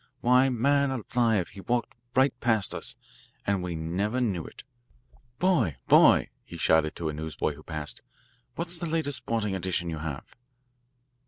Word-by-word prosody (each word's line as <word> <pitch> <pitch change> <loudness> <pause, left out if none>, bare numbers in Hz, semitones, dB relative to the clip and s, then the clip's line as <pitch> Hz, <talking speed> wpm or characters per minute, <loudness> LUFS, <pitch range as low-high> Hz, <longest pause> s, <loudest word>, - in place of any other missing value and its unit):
Why, 125 +2 +5
man 140 +3 +2
alive, 115 -5 0
he 100 - -11
walked 120 +3 -1 0.2
right 130 +2 +4
past 110 -4 +1
us, - - -1 0.5
and 100 -2 +1
we 90 -1 -4
never 95 +9 -1
knew 100 -9 0
it. - - -12 0.7
Boy, 170 - +2
boy," - - +6
he - - -10
shouted 80 -1 +2
to 80 -2 -3
a - - -3
newsboy 80 0 -3
who 75 - -13
passed, 75 -2 -5 0.5
"what's 170 0 -2
the 170 - -3
latest 155 -4 +1
sporting 110 -3 -2
edition 90 -2 -2
you 80 - -4
have?" 75 -3 -6
105 Hz, 155 wpm, -27 LUFS, 80-130 Hz, 0.7 s, boy